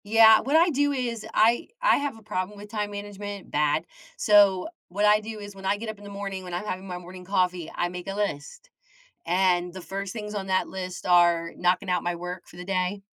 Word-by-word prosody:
Yeah, 220 +1 +7
what 280 +4 0
I 335 +2 +6
do 285 0 +2
is, 240 -5 -3
I 230 +8 +3
I - - +5
have 285 -5 -3
a 220 - -16
problem 185 0 -3
with 205 +1 -10
time 210 -2 -2
management- 205 -1 -7
bad- 150 +2 +1 0.3
so, 200 -3 +5 0.2
what 200 +4 0
I 210 0 +6
do 215 0 -7
is, 205 -1 -9
when 195 0 -10
I 200 +2 +2
get 220 +1 -6
up 215 -2 -7
in - - -14
the 205 - -9
morning, 200 -1 -5
when 180 -1 -8
I'm 180 - -4
having 190 -1 -4
my 180 -1 -5
morning 180 +1 -10
coffee, 180 -3 0
I 175 - 0
make 180 0 -7
a 195 - -3
list, 210 - -4 0.6
and 180 0 +2
the 190 - -6
first 195 +2 -5
things 210 -2 -6
on 195 -1 -3
that 185 0 +1
list 185 -1 -6
are, 175 -2 +4
knocking 180 +2 +1
out 180 - 0
my 175 0 0
work 180 +1 -7
for - - -16
the 180 - -7
day, 190 +1 -1
195 Hz, 230 wpm, -26 LUFS, 180-210 Hz, 0.6 s, Yeah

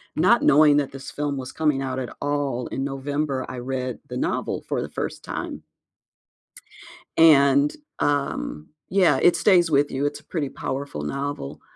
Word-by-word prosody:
not - - +4
knowing 150 0 +6
that 145 -2 0
this 135 0 -9
film 145 -1 -2
was 130 -1 -6
coming 150 -4 0
out 130 -1 -3
at 125 - -6
all 140 -4 -1
in 135 - -3
November, 140 0 -2
I 130 - -6
read 130 0 -4
the - - -4
novel - - -2
for - - -1
the - - -5
first - - -5
time. - - -5 1.6
And, 140 -3 +5 0.2
um, 140 - -1 0.2
yeah, 190 -2 +3
it 175 - +5
stays 175 -5 +4
with 145 0 +3
you. 135 +2 -1
It's 145 +1 -4
a - - -26
pretty 155 -3 -3
powerful 135 - -5
novel, 140 - -4
140 Hz, 165 wpm, -24 LUFS, 130-145 Hz, 1.6 s, knowing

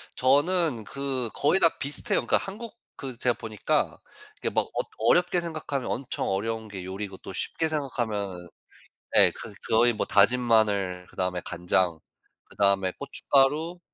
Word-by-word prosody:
저는 145 -1 +2
그 130 0 -3
거의 150 +7 +2
다 165 - +8
비슷해요. 140 +1 0
그러니까 - - +4
한국 220 +4 -7 0.2
그 130 -4 -7
제가 125 -1 +1
보니까 110 -2 -1 0.4
그렇게 - - -2
막 - - +2
엇 - - 0
어렵게 180 0 +3
생각하면 155 -5 -4
엄청 130 +1 -3
어려운 110 +3 -2
게 95 -3 -7
요리고 95 0 -6
또 - - -10
쉽게 160 - -2
생각하면은 110 - -3 0.7
예 - - +7
그 - - -10 0.2
거의 120 +2 +4
뭐 110 - -2
다진 105 +5 +4
마늘 100 -6 +2
그다음에 90 -1 -2
간장 90 -1 0 0.5
그다음에 100 -2 +2
고춧가루 150 +6 +1
120 Hz, 320 characters per minute, -26 LUFS, 100-145 Hz, 0.7 s, 다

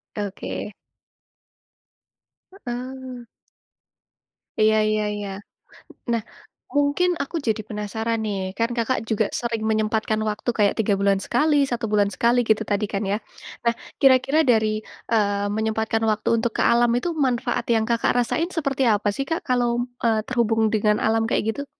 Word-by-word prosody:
Oke. 205 0 -5 1.9
Oh. 250 0 -6 1.4
Iya 220 0 +5
iya 215 0 +1
iya. 205 -1 -5 0.8
Nah, 230 -1 +1 0.5
mungkin 290 +5 +2
aku 280 - -9
jadi 220 -1 +1
penasaran 220 +2 -2
nih. 205 -2 -2 0.2
Kan 230 0 +1
Kakak 235 +3 +1
juga 220 0 +2
sering 230 -2 -2
menyempatkan 215 0 0
waktu 210 +3 -3
kayak, 205 -2 +3
3 210 -2 +2
bulan 200 -1 +2
sekali, 295 +5 +2 0.2
1 235 -1 -1
bulan 205 -1 +3
sekali, 240 +1 +3
gitu, 220 0 +3
tadi 205 +1 +1
kan, 195 - -1
ya? 205 - +1 0.5
Nah, 235 - +3 0.3
kira-kira 270 +3 +5
dari, 220 -2 +4 0.4
eee, 205 -2 +2
menyempatkan 220 0 0
waktu 210 0 -3
untuk 225 +1 0
ke - - +1
alam 240 0 +4
itu, 295 +8 -1 0.2
manfaat 245 -2 -1
yang 220 -1 +2
Kakak 235 0 +2
rasain 320 +8 0
seperti 275 -4 0
apa 205 0 0
sih, 275 - -2
Kak, 325 - -1
kalau 245 -1 +2
m - - 0 0.2
eee, 225 -1 +3
terhubung 230 -3 +1
dengan 210 -1 +2
alam 225 +1 +2
kayak, - - +1
gitu? 285 - -5
225 Hz, 150 wpm, -23 LUFS, 215-245 Hz, 1.9 s, Iya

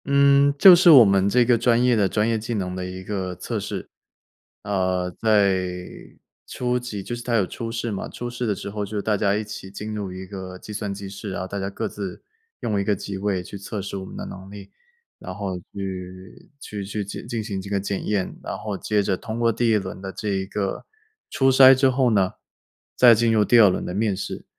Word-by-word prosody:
嗯， 140 0 +5
就 185 +4 +10
是 175 0 +5
我 135 -8 +10
们 100 0 +3
这 120 +3 +4
个 120 0 +4
专 120 0 +3
业 125 -1 +4
的 100 -3 +2
专 105 +3 +1
业 115 -1 0
技 115 +2 -4
能 90 -3 -3
的 90 - -4
一 90 0 -7
个 95 -2 -4
测 - - -4
试。 - - -6 0.7
呃， 95 -2 -1
在 100 -2 +2 0.9
初 125 0 -1
期， 110 -5 -6
就 120 - -4
是 120 - -7
它 120 -1 -1
有 105 -4 +3
初 115 +4 -6
试 115 0 -3
嘛， 100 - -4
初 120 - -6
试 120 0 -4
的 105 - 0
时 100 - -7
候 105 0 -3
就 105 +1 -4
大 105 +1 0
家 100 0 +1
一 105 - -1
起 105 -2 -8
进 105 +2 -6
入 100 -3 -4
一 95 +1 -7
个 95 -1 -8
计 105 - -10
算 105 -1 -3
机 100 0 -7
机 - - -8
室， 100 +1 -7
然 - - -4
后 95 - -4
大 100 +1 -5
家 95 0 -3
各 110 +3 -4
自 100 -3 -7 0.4
用 105 -3 -1
一 - - 0
个 105 +1 +1
机 95 0 -6
位 95 -2 -1
去 100 - -9
测 100 +2 -6
试 100 +1 -6
我 95 - -6
们 - - -10
的 - - -5
能 95 0 -9
力， 100 -1 -11 0.5
然 - - -8
后 95 -3 -4
去 95 -1 -8
去 105 -7 -6
去 100 +1 -4
进 100 - -8
进 115 -2 -3
行 100 -2 -4
这 100 - -9
个 100 -1 0
检 100 0 -4
验， 100 -3 -1
然 - - -5
后 105 0 -5
接 105 0 0
着 95 -1 0
通 110 +5 -6
过 115 -1 +3
第 115 +1 0
1 110 - +4
轮 95 -1 -6
的 95 0 -6
这 105 +2 -5
一 95 -1 -1
个 100 -1 -3 0.4
初 135 0 +2
筛 130 0 +8
之 135 +1 +3
后 130 -1 +2
呢， 95 -3 +2 0.6
再 120 -2 +7
进 115 +1 +2
入 105 -1 +3
第 120 +4 +5
2 105 -3 +8
轮 90 - -2
的 90 - -4
面 105 0 0
试。 100 - -6
105 Hz, 255 characters per minute, -23 LUFS, 95-115 Hz, 0.9 s, 就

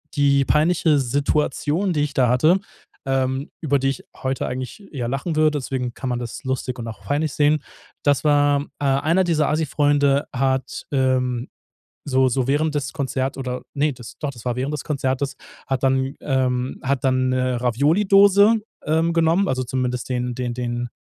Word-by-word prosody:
die 140 -1 +3
peinliche 155 0 +3
Situation, 145 +6 0
die 150 - 0
ich 145 -1 -1
da 130 -3 +3
hatte, 155 +10 +4 0.5
ähm, 135 +1 -1
über 140 -3 +1
die 135 +1 +1
ich 135 - -4 0.2
heute 130 0 -1
eigentlich 130 - -6
eher 125 -5 -3
lachen 140 +5 -2
würde, 155 0 +4
deswegen 125 -2 -3
kann 130 +1 -5
man 120 - -1
das 120 +8 -7
lustig 130 -1 -3
und 115 - -5
auch 115 - -8
peinlich 150 +1 -1
sehen, 150 0 +2 0.4
das 145 -2 +2
war 145 -1 +4 0.2
äh, 145 - -2
einer 150 +7 +2
dieser 160 -4 +1
Assi-Freunde 145 -2 +2
hat, 130 0 -1
ähm, 130 -2 +1 0.6
so 130 -1 +3
so 125 0 0
während 150 +2 +1
des 140 -1 -2
Konzert 135 -2 -2
oder 125 -1 -4
ne, 145 0 +1
das 120 -2 -11
doch, 145 - -2
das 120 -5 -13
war 125 - -1
während 135 +3 -2
des 150 - -5
Konzertes, 135 -1 -1 0.3
hat 135 -2 -2
dann, 135 0 +1
ähm, 130 -2 -1
hat 135 0 0
dann 130 -1 +2
'ne 130 -1 0
Ravioli-Dose, 195 - +4 0.3
ähm, 160 +2 +1
genommen 165 +4 +2
also, 130 -1 -1
zumindest 125 -1 -2
den 125 -1 -1
den 125 -1 -3
den 120 0 -3
135 Hz, 175 wpm, -22 LUFS, 130-150 Hz, 0.6 s, hatte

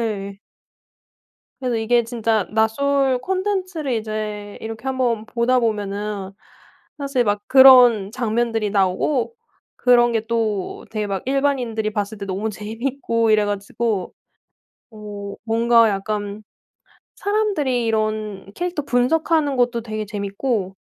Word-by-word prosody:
예. 200 -3 -3 1.2
그래서 250 -3 -1
이게 235 +2 +2
진짜 225 -3 0
나솔 260 +5 +2
콘텐츠를 370 -2 -2
이제 215 -2 -4
이렇게 225 +3 -7
한번 245 -4 0
보다 245 +2 +1
보면은 205 -2 -3 0.7
사실 275 -3 0
막 205 -1 0
그런 250 -6 +7
장면들이 230 -3 -1
나오고 205 - +1 0.4
그런 240 -1 +4
게 225 -1 0
또 220 -4 -2
되게 215 -1 -2
막 195 -2 -3
일반인들이 255 -6 0
봤을 205 0 -3
때 200 - -5
너무 195 +3 -2
재미있고 230 +2 -2
이래 215 -1 +4
가지고 205 0 -2 0.8
어 205 -2 -8
뭔가 230 0 +4
약간 205 +1 -3 0.7
사람들이 375 - 0
이런 215 -3 -2
캐릭터 350 -1 -3
분석하는 285 +3 +1
것도 245 -1 +1
되게 215 -1 -4
재미있고 200 0 -3
225 Hz, 260 characters per minute, -21 LUFS, 210-255 Hz, 1.2 s, 그런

